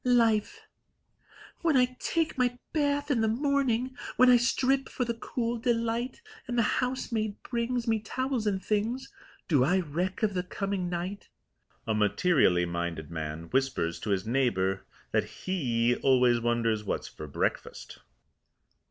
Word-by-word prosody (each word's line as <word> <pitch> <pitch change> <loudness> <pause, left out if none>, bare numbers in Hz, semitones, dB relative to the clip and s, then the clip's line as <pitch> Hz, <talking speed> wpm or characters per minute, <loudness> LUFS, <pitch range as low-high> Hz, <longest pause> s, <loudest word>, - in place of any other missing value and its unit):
LIFE 240 - +2 1.0
When 320 -5 +3
I 250 0 +2
take 330 -2 0
my 245 -1 +1 0.2
bath 290 -1 +1
in 240 -5 +2
the 220 - +2
morning, 260 0 +1 0.2
When 255 0 +7
I 245 - +8
strip 265 +2 +1
for 250 - -2
the 235 - -1
cool 230 0 -3
delight, 235 - -1 0.2
And 245 0 -2
the 235 - +4 0.2
housemaid 230 -4 -2
brings 240 0 -2
Me 225 -1 +2
towels 255 +1 -2
and 195 -2 -1
things, 230 - -1 0.3
Do 145 -7 +4
I 180 +8 +3
reck 180 +6 -3
of 210 -2 +2
the 180 - 0
coming 190 0 -3
night? 180 +3 -4 0.6
A 110 - 0
materially 105 - +3
minded 85 -2 -4
man 80 0 -4
whispers 130 -11 0
to 110 - -5
his 100 -1 0
neighbour 110 -6 0 0.2
that - - +2 0.2
he 120 -10 +1
always 125 -3 +4
wonders 115 -2 0
what's 100 - -3
for 75 - -9
breakfast. 70 - -3
210 Hz, 145 wpm, -29 LUFS, -, 1.0 s, I